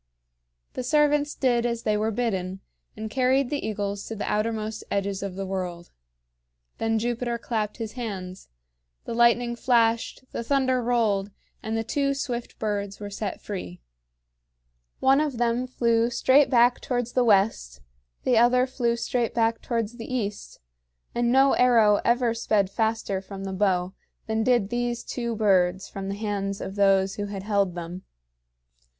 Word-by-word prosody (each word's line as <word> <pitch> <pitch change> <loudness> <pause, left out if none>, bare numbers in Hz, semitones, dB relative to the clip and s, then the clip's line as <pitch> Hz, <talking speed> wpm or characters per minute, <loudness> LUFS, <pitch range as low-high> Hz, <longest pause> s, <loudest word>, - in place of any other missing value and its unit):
The - - -3
servants 295 +1 +2
did 240 -3 +2
as 235 -1 -2
they 215 - +1
were 215 +1 0
bidden, 195 -5 -2 0.4
and 220 0 -4
carried 260 +3 +1
the 290 - -2
eagles 205 -2 -3
to 225 - -5
the 210 - -4
outermost 215 0 -2
edges 200 -1 -1
of 195 -2 -5
the 195 0 -4
world. 180 -2 -5 0.9
Then 225 0 +1
Jupiter 240 +1 -1
clapped 220 -3 -3
his 225 -2 -5
hands. 195 -7 -6 0.6
The - - -4
lightning 235 0 +3
flashed, 230 -1 +1
the - - -3
thunder 260 0 +1
rolled, 220 -5 +1 0.3
and 220 +1 -2
the 225 - -1
two 275 +4 0
swift 245 -3 -4
birds 205 -2 -3
were 205 -1 -6
set 200 -1 -5
free. 180 - -6 1.2
One 270 +2 +4
of 290 -5 -2
them 240 +1 0
flew 235 -2 +1
straight 260 +4 +4
back 245 -1 +4
towards 245 -2 -2
the 250 - +2
west, 195 - +2 0.4
the 245 -3 +3
other 250 +2 +4
flew 245 -3 0
straight 235 0 -1
back 230 -1 +1
towards 230 -2 -2
the 230 +1 -8
east; 210 -5 -4 0.5
and 240 0 +1
no 270 +2 +5
arrow 230 -4 +5
ever 240 -1 +2
sped 210 -4 +1
faster 220 -3 -1
from 195 0 -8
the 195 0 -4
bow 185 -2 +1 0.3
than 220 0 -1
did 240 -5 +2
these 240 0 -1
two 235 -2 -3
birds 190 -3 +2
from 195 0 -6
the 200 - -3
hands 200 -2 -3
of 190 - -5
those 195 -1 +3
who 205 0 -3
had 200 -1 -6
held 200 -3 +1
them. 175 +1 -6
225 Hz, 160 wpm, -25 LUFS, 200-240 Hz, 1.2 s, no